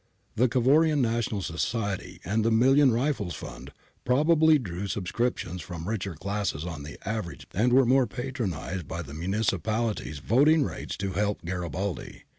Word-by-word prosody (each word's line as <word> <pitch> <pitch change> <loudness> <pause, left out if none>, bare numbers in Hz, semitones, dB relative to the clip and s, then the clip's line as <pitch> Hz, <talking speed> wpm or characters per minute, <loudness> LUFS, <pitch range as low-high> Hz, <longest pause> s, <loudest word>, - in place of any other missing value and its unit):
The 125 +4 +4
Cavourian 145 +6 +4
National 115 -4 0
Society 95 0 -3
and 105 +5 +1
the 115 - +3
Million 130 +4 +5
Rifles 115 - -1
fund - - -9 0.3
probably 155 +4 +4
drew 100 -6 -5
subscriptions 95 -1 -2
from 85 -1 -7
richer 100 -5 -3
classes 100 -2 -2
on 80 -4 -5
the 70 0 -8
average, 110 -5 -4
and 115 +6 +2
were 130 +1 +6
more 130 +1 +4
patronised 100 - -4
by 85 +1 -4
the 70 -1 -10
municipal 105 +5 0
ities 75 -7 -7
voting 145 - +4
rates - - -5
to 95 0 -2
help 100 0 -1
Garibaldi. 90 +1 -4
105 Hz, 150 wpm, -27 LUFS, 90-125 Hz, 0.3 s, were